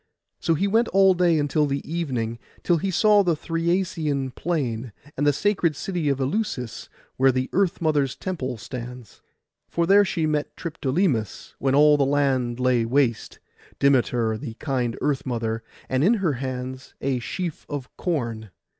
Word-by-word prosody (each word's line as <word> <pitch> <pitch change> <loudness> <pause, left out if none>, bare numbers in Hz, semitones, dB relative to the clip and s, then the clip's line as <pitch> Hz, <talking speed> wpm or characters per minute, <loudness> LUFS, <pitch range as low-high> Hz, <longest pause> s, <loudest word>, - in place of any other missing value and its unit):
So 165 -2 +1
he 195 +6 +1
went 225 +3 +3
all 195 -1 +5
day 175 -2 +3
until 150 0 +1
the 140 0 -3
evening, 125 -9 -2 0.2
till 175 - +3
he 195 +5 -2
saw 205 +3 +5
the 175 -4 +2
Thriasian 165 -4 -1
plain, 125 - -2 0.2
and 145 +2 0
the - - +6
sacred 175 -1 +1
city 175 -2 -2
of 140 -1 0
Eleusis, 135 - -2 0.3
where 135 0 +5
the 130 0 -2
Earth 190 -2 +1
mother's 145 -4 +1
temple 130 -10 -4
stands. 125 -1 -8 0.5
For 170 - 0
there 200 +3 +6
she 170 -4 -1
met 150 -1 -2
Triptolemus, 145 - -1
when 135 0 +1
all 150 +1 +6
the 140 - +3
land 135 -4 +1
lay 125 -2 +2
waste, 120 0 0 0.4
Demeter 120 -5 +2
the 115 - -7
kind 125 -4 -2
Earth 140 -2 0
mother, 115 -2 -2 0.3
and 130 +2 +1
in 215 +8 +5
her 185 -8 0
hands 130 0 -5
a 135 -2 -1
sheaf 165 +7 -5
of 140 -4 -6
corn. 115 - -3
140 Hz, 160 wpm, -24 LUFS, 125-170 Hz, 0.5 s, the